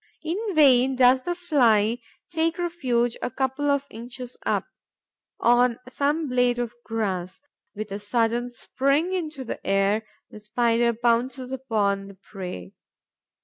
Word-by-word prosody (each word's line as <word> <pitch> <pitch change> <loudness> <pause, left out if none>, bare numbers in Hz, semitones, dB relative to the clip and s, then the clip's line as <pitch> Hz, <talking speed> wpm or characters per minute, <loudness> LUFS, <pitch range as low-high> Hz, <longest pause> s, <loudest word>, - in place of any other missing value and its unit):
In 380 +5 -2
vain 265 -3 +5
does 255 +1 +5
the 350 +6 -2
Fly 240 - +3 0.3
take 330 0 0
refuge 255 -10 0
a - - -1
couple 265 +3 -1
of 280 0 +1
inches 240 +2 -8
up, - - +1 0.7
on 240 0 +4
some 290 +4 0
blade 245 -1 +2
of 240 -1 -3
grass. 190 -5 -3 0.4
With 215 0 -6
a 200 - -4
sudden 230 +3 0
spring 275 +8 0
into 315 -7 -3
the 240 - -6
air, 195 +2 +2 0.3
the 215 - -10
Spider 235 +2 +1
pounces 245 +3 0
on 200 -3 +1
the 200 - -12
prey. 180 - -8
245 Hz, 135 wpm, -25 LUFS, 220-275 Hz, 0.7 s, vain